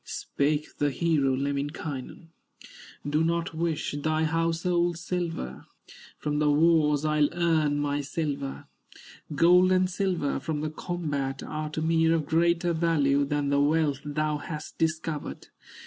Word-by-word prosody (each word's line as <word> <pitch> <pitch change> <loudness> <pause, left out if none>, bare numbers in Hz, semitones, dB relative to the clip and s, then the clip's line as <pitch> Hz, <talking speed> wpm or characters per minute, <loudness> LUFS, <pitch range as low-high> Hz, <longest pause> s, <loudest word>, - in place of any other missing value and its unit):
Spake 150 +1 -2
the 145 - +2
hero, 140 -2 +1
Lemminkainen: 140 +2 -4 0.8
"Do 150 +2 +1
not 170 +1 -1
wish 160 -1 -1
thy 155 +1 +1
household 165 +2 +1
silver, 170 - -4 0.5
From 150 -1 -2
the 150 0 +3
wars 150 -1 +3
I'll 150 -1 +3
earn 160 -4 +2
my 145 0 -1
silver; 140 -1 -4 0.7
Gold 180 +4 +5
and 185 0 +3
silver 180 -7 -1
from 150 +1 -3
the 155 0 -3
combat 145 -6 -3
Are 155 0 -4
to 155 +1 -3
me 165 0 +3
of 160 -2 +2
greater 170 +2 +2
value 145 -4 +2
Than 145 0 -1
the 140 0 +3
wealth 150 -1 +2
thou 150 0 -1
hast 150 +1 -7
discovered. 160 -1 -2
155 Hz, 130 wpm, -27 LUFS, 145-165 Hz, 0.8 s, Gold